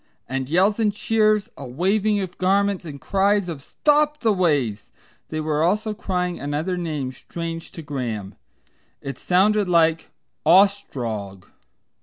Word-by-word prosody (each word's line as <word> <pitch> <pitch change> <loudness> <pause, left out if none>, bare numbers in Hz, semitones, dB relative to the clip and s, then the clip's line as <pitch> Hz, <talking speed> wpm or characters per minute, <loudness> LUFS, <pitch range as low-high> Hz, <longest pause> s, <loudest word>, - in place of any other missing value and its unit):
and 130 0 -3
yells 195 +7 +3
and 210 -2 +1
cheers, 215 -1 +2
a 140 - -8
waving 200 +10 +1
of 185 -2 -6
garments 195 0 +1
and 145 -3 -8
cries 200 +3 +1
of 160 -5 -5
"Stop 300 - +1
the 225 -3 +3
Ways!" 145 - 0 0.4
They 155 - -3
were 155 -1 0
also 210 +6 +1
crying 180 -4 -2
another 150 +6 -2
name 155 -7 -3
strange 165 +4 -7
to 165 - -8
Graham. 120 -9 -4 0.7
It 135 -2 -7
sounded 200 +2 +2
like 165 -2 +3 0.3
"Ostrog." 125 - +2
175 Hz, 135 wpm, -23 LUFS, 145-200 Hz, 0.7 s, yells